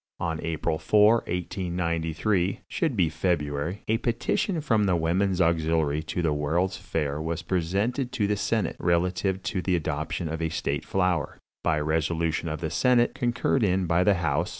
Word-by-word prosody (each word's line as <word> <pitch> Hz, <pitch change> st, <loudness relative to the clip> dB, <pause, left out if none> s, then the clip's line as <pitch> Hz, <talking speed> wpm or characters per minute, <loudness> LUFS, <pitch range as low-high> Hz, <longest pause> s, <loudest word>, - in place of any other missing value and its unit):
"On 80 Hz, -2 st, -2 dB
April 80 Hz, -1 st, -2 dB
4, 105 Hz, +2 st, +5 dB
1893 90 Hz, +1 st, -1 dB
[should 155 Hz, -9 st, -1 dB
be 90 Hz, -4 st, +4 dB
February], 80 Hz, +1 st, -2 dB
a 110 Hz, +1 st, +1 dB
petition 125 Hz, -, 0 dB
from 115 Hz, -8 st, +2 dB
the 95 Hz, -2 st, +2 dB
Women's 90 Hz, +3 st, +1 dB
Auxiliary 80 Hz, -3 st, +2 dB
to 85 Hz, +2 st, -3 dB
the 80 Hz, -2 st, +2 dB
World's 85 Hz, +6 st, 0 dB
Fair 75 Hz, -5 st, -3 dB
was 80 Hz, +1 st, -3 dB
presented 100 Hz, -, -1 dB
to 115 Hz, -5 st, +1 dB
the 105 Hz, +1 st, +1 dB
senate, 105 Hz, +1 st, -1 dB
relative 90 Hz, +2 st, 0 dB
to 95 Hz, -, -2 dB
the 90 Hz, 0 st, +1 dB
adoption 80 Hz, +1 st, -2 dB
of 80 Hz, +1 st, -4 dB
a 80 Hz, -, 0 dB
state 80 Hz, -, -2 dB
flower. 90 Hz, -6 st, 0 dB, 0.3 s
By 80 Hz, -2 st, +2 dB
resolution 80 Hz, +2 st, 0 dB
of 80 Hz, +1 st, -4 dB
the 80 Hz, -, -2 dB
senate, 125 Hz, -2 st, +3 dB
concurred 120 Hz, +2 st, 0 dB
in 95 Hz, -2 st, +2 dB
by 85 Hz, +1 st, +2 dB
the 100 Hz, +1 st, +4 dB
house 85 Hz, -1 st, 0 dB
85 Hz, 165 wpm, -26 LUFS, 80-100 Hz, 0.3 s, 4